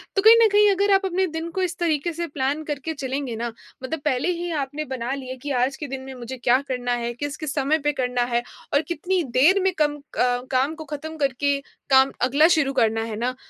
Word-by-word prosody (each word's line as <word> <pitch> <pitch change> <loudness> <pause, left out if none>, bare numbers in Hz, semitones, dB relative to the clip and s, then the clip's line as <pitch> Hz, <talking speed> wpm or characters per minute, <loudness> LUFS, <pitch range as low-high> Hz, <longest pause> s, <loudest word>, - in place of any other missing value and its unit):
तो 390 - +3
कहीं 445 +2 +9
न 450 - +7
कहीं 415 0 +5
अगर 400 +1 +2
आप 390 0 +3
अपने 375 +1 +1
दिन 325 0 -5
को 375 +2 -2
इस 350 -3 -1
तरीके 335 -1 0
से 340 +1 -3
प्लान 285 +1 -2
करके 300 +1 -4
चलेंगे 270 -3 -3
ना, 235 +1 -3 0.3
मतलब 315 +4 -3
पहले 265 +4 +1
ही 345 +1 -4
आपने 290 +3 -4
बना 255 0 -2
लिया 260 -2 -5
कि 290 - -3
आज 270 +2 +1
के 295 - -5
दिन 270 0 -5
में 265 0 -8
मुझे 250 +1 -7
क्या 245 +1 +3
करना 245 -1 -2
है, 240 0 -2
किस-किस 290 +3 -4
समय 285 +2 +2
पे 295 0 +1
करना 250 -2 0
है 235 - +3 0.3
और 285 - +4
कितनी 350 +2 0
देर 345 +10 +5
में 380 -1 +2
कम 295 -1 +2
अ, - - -16 0.5
काम 270 +4 +1
को 315 -1 -9
खत्म 315 +2 -6
करके 280 0 +1 0.3
काम 265 0 +6
अगला 280 +6 +5
शुरू 275 -3 +1
करना 225 -3 +2
है 225 - -5
ना, 250 +3 -2
285 Hz, 230 wpm, -23 LUFS, 260-325 Hz, 0.5 s, कहीं